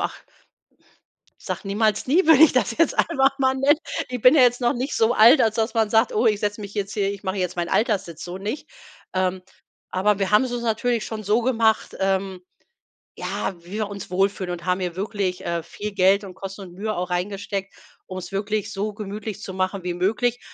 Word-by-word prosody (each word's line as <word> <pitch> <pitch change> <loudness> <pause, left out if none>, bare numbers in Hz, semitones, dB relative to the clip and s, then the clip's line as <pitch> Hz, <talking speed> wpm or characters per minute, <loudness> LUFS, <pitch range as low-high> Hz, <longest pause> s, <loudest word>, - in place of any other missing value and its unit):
Ach, - - -3 1.2
sage - - -5
niemals 210 +2 0
nie 330 +7 +3
würde 320 -2 +7
ich 320 - +7
das 230 -3 0
jetzt 330 - +2
einfach 275 -3 +2
mal 260 -1 +2
nennen 280 +3 +3 0.3
ich 250 -3 -5
bin 250 +4 +7
ja 295 - +6
jetzt 245 0 +4
noch 240 - +3
nicht 260 +3 -3
so 225 +2 +3
alt 235 +7 +7
als 220 0 +2
das 225 +1 0
man 220 -2 +2
sagt: 225 +2 +3
„Oh 225 +3 +2
ich 210 -2 +2
setze 210 0 -2
mich 200 0 -8
jetzt 200 -1 -3
hier 200 -1 0
ich 200 - -9
mache 190 0 -3
jetzt 180 -1 -2
mein 170 -1 -2
Alterssitz“, 195 -8 -1
so 180 +1 -6
nicht. 210 +9 -5 0.5
Ähm, 185 0 0 0.5
aber 195 +2 +1
wir 195 0 -1
haben 210 +5 +5
es 250 - -4
uns 240 -1 -3
natürlich 230 0 0
schon 215 -1 -5
so 215 +4 +1
gemacht, 225 -3 +1
ähm, 190 -1 -1 0.8
ja, - - -3
wie 175 - -14
wir 215 -1 -2
uns 200 -3 -8
wohlfühlen 190 -1 0
und 175 -1 -6
haben 180 0 +1
hier 180 -2 -3
wirklich, 195 -2 -2
äh, 170 -1 -2
viel 205 +5 -6
Geld 195 +1 +4
und 185 -2 -9
Kosten 195 +1 -8
und 180 -2 -10
Mühe 215 +3 -3
auch 180 +1 -3
reingesteckt, 195 +2 -3 0.3
um 185 - -7
es 180 +1 -7
wirklich 205 +1 -2
so 210 +1 -3
gemütlich 210 0 -6
zu 190 - -7
machen 185 0 -2
wie 180 -1 -2
möglich. 220 +7 0
205 Hz, 215 wpm, -23 LUFS, 190-230 Hz, 1.2 s, würde